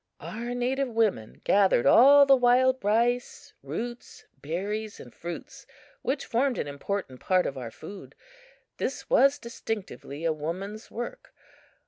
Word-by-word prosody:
Our 240 +2 -5
native 260 +3 0
women 220 - -1
gathered 195 -11 +3
all 280 - +8
the 275 -1 +7
wild 255 0 +3
rice, 235 +4 0
roots, 240 +1 -7 0.2
berries 205 +7 -4
and 120 - -12
fruits 170 0 -8 0.3
which 275 +2 -2
formed 250 +1 0
an - - -2
important 145 -1 -4
part 185 -1 +2
of 135 - -3
our 125 -3 -6
food. 195 - -11 0.6
This - - -4
was 280 - +5
distinctively 210 - -6
a 165 - +2
woman's 185 +8 -6
work. 240 - -7
220 Hz, 130 wpm, -27 LUFS, 180-245 Hz, 0.6 s, all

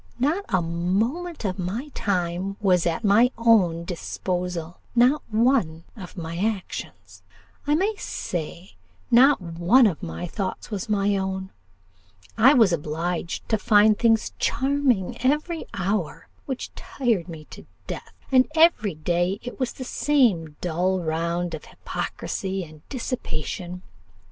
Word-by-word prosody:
Not 320 +10 0
a 185 -4 +2
moment 215 - -1
of 185 -1 -2
my 210 +11 -3
time 185 0 -1
was 180 -5 +3
at 170 +6 -1
my 215 +4 +5
own 190 -8 +3
disposal 180 -1 -4 0.2
not 250 +5 +4
one 220 -8 +2
of 190 -4 -10
my 165 0 -5
actions; 205 -1 -4 0.5
I 295 - +4
may 390 +7 +1
say, 175 - -5 0.4
not 270 +5 +6
one 175 +8 +3
of 185 -8 0
my 80 - -5
thoughts 190 +5 -4
was 205 +2 -4
my 205 -1 +2
own; 190 0 -3 0.8
I 270 +6 +6
was 220 -8 +5
obliged 165 +3 -3
to 220 - +2
find 210 +1 +5
things 225 0 +2
'charming' 265 -7 +1
every 300 +6 0
hour, 195 -2 -2 0.2
which 265 -2 -5
tired 225 -10 -1
me 155 -2 -9
to - - -11 0.2
death; - - -7 0.2
and 255 -1 +5
every 315 - +4
day 175 +5 0
it 245 +2 -7
was 255 -2 -1
the 260 - -7
same 230 - +1
dull 180 +2 0
round 170 +1 -1
of 155 - -6
hypocrisy 190 -1 -4
and 155 -2 -13
dissipation. 180 - -4
195 Hz, 135 wpm, -24 LUFS, 175-240 Hz, 0.8 s, not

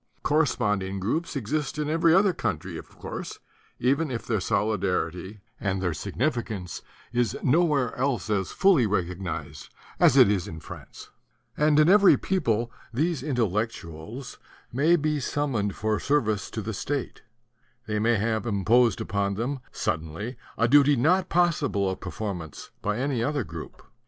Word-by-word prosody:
Corre 155 +2 +3
sponding 100 -5 -1
groups 155 - -2
exist 145 +3 -2
in 150 -1 -1
every 165 +2 +3
other 190 +2 +5
country, - - -3
of - - -8
course, - - -6 0.4
even 140 +5 +1
if 120 -3 -4
their 110 -3 0
solidarity 95 -1 -1 0.2
and 95 -2 -1
their 90 -2 0
signifi 120 - -1
cance 90 -6 -6 0.3
is 120 -3 +1
nowhere 150 -2 +2
else 125 -6 -1
as 100 -4 0
fully 180 - +4
recognized 85 -6 -3 0.3
as - - +5
it - - +8
is 100 -3 0
in 80 - -7
France; - - -11 0.4
and 150 0 +3
in 155 - +6
every 200 +1 +7
people 120 - 0 0.2
these 155 +4 0
Intellec 115 - 0
tuals 105 - -9 0.4
may 155 +7 +4
be 150 -2 0
summoned 125 -8 -1
for 110 -1 0
service 110 -8 0
to 110 - -5
the 110 +2 -4
state; 140 +6 -3 0.6
they 105 -1 -1
may 115 +2 +3
have 110 +2 -1
imposed 110 +2 +3
upon 100 -1 -1
them 130 +6 -2
suddenly 80 +10 -3 0.2
a 115 - +3
duty 145 +2 +6
not 180 +9 +2
possible 170 - +2
of 95 - -2
performance 90 -7 -6
by 105 +1 -1
any 130 -2 -1
other 145 0 0
group. - - -9
115 Hz, 150 wpm, -26 LUFS, 100-145 Hz, 0.6 s, it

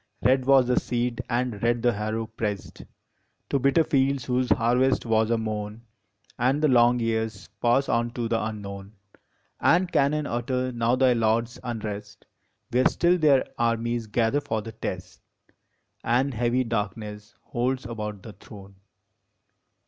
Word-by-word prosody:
Red 130 0 +3
was 135 -1 +5
the 125 0 +2
seed 120 0 -2
and 120 -4 -1
red 120 0 +1
the 120 -1 +3
harrow 110 +2 -3
pressed 105 -3 -5 0.7
To 140 - +2
bitter 140 +5 +3
fields 140 -4 +1
whose 125 0 0
harvest 125 +3 +2
was 110 -1 +2
a 115 - +2
moan; 110 0 -4 0.6
And 130 +4 +2
the 155 -1 +3
long 120 -1 +4
years 110 -3 -2
pass 120 +3 +3
on 120 0 +1
to 120 -2 -2
the 115 0 0
unknown, 100 -2 -6 0.7
And 180 +1 +3
cannon 150 +1 +2
utter 125 +1 -2
now 120 0 +1
thy 130 -1 +4
lords 115 +1 0
unrest, 105 -3 -6 0.5
Where 125 +2 +4
still 175 +1 +2
their 145 -4 +4
armies 115 0 0
gather 115 +6 +1
for 110 -6 -3
the 115 - -7
test, 110 - -6 0.8
And 130 +4 +1
heavy 120 +2 +1
darkness 105 -2 -4
holds 130 +2 -2
about 105 -4 -6
the 110 - -10
throne. 100 -1 -14
120 Hz, 145 wpm, -25 LUFS, 110-130 Hz, 0.8 s, was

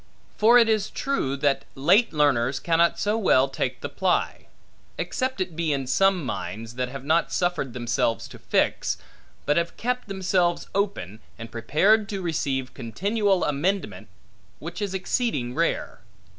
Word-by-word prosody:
For 230 +3 +6
it 235 -2 +6
is 215 -2 +1
true, 195 - -2
that 140 -1 +1
late 190 - +4
learners 135 -4 +2
cannot 170 0 +2
so 210 +2 0
well 135 -10 +4
take 135 - -3
the - - -3
ply; - - -1 0.5
except 260 -3 -2
it 180 -3 -3
be 165 -2 0
in 135 -2 -1
some 185 +4 +2
minds, 115 -2 -5
that 125 0 -2
have 135 0 -8
not 160 +3 +2
suffered 175 -8 -1
themselves 120 -2 -1
to - - -12
fix, - - 0 0.5
but 145 - +2
have 170 0 -1
kept 250 0 -2
themselves 185 -3 0
open, 195 - -2 0.2
and 115 -1 -9
prepared 200 - +2
to 195 -2 -3
receive 135 -6 -2
continual 195 - 0
amendment, 175 +7 -1 0.5
which - - -7
is 200 -2 -2
exceeding 185 - -1
rare. 165 +5 -1
170 Hz, 150 wpm, -25 LUFS, 135-200 Hz, 0.5 s, For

